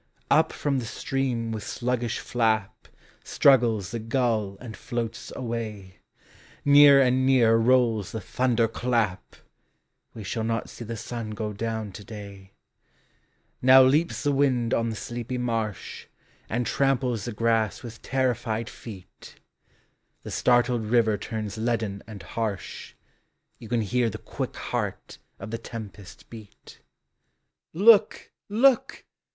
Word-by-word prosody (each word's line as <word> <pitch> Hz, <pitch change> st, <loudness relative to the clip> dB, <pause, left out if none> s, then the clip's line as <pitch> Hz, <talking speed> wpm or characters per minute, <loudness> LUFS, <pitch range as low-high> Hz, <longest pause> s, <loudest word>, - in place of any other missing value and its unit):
121 145 Hz, -, +6 dB
Up -, -, -13 dB
from 140 Hz, -2 st, -1 dB
the 120 Hz, -, -5 dB
stream 125 Hz, -3 st, -2 dB
with 110 Hz, -1 st, -4 dB
sluggish 120 Hz, +2 st, -2 dB
flap 110 Hz, -4 st, -1 dB, 0.4 s
Struggles 115 Hz, -8 st, +3 dB
the 115 Hz, -, -3 dB
gull 110 Hz, -4 st, -1 dB
and 115 Hz, -3 st, -9 dB
floats 115 Hz, -1 st, -5 dB
away; 110 Hz, -6 st, -5 dB, 0.7 s
Nearer 145 Hz, -1 st, +8 dB
and 130 Hz, 0 st, +2 dB
nearer 120 Hz, -4 st, +4 dB
rolls 115 Hz, -4 st, +2 dB
the 110 Hz, -, -4 dB
thunder 120 Hz, +2 st, +1 dB
clap 115 Hz, -4 st, -2 dB, 0.8 s
^Ye 110 Hz, -3 st, -8 dB
shall 110 Hz, +4 st, -3 dB
not 115 Hz, -1 st, -2 dB
see -, -, -9 dB
the 115 Hz, 0 st, -6 dB
sun 115 Hz, 0 st, -6 dB
go 105 Hz, 0 st, -4 dB
down 110 Hz, 0 st, -4 dB
to 105 Hz, -, -10 dB
day: 100 Hz, -3 st, -11 dB, 1.1 s
Now 130 Hz, +1 st, +8 dB
leaps 150 Hz, +6 st, +2 dB
the 145 Hz, -, +2 dB
wind 130 Hz, -4 st, +1 dB
on 115 Hz, 0 st, +1 dB
the 110 Hz, -, -4 dB
sleepy 120 Hz, +2 st, -5 dB
marsh, 115 Hz, -4 st, -3 dB, 0.4 s
And 120 Hz, +2 st, -1 dB
tramples 125 Hz, -6 st, 0 dB
the 120 Hz, -, -4 dB
grass 115 Hz, 0 st, 0 dB
with 115 Hz, -2 st, -9 dB
terrified 120 Hz, -4 st, -1 dB
feet, 100 Hz, -6 st, -12 dB, 0.9 s
The -, -, -7 dB
startled 120 Hz, -1 st, +2 dB
river 110 Hz, -1 st, +3 dB
turns 110 Hz, 0 st, -5 dB
leaden 110 Hz, -4 st, -1 dB
and 105 Hz, -5 st, -9 dB
harsh, 105 Hz, +2 st, -5 dB, 0.6 s
You 115 Hz, -, -11 dB
can 120 Hz, -1 st, +1 dB
hear 120 Hz, +3 st, +1 dB
the -, -, -6 dB
quick -, -, -6 dB
heart -, -, -4 dB, 0.2 s
of -, -, -8 dB
the 115 Hz, -, -3 dB
tempesl 105 Hz, -4 st, -9 dB
beat. 110 Hz, -3 st, -14 dB, 0.9 s
Look! 205 Hz, +5 st, +4 dB, 0.2 s
look! 245 Hz, +5 st, +2 dB
115 Hz, 135 wpm, -26 LUFS, 110-125 Hz, 1.1 s, Nearer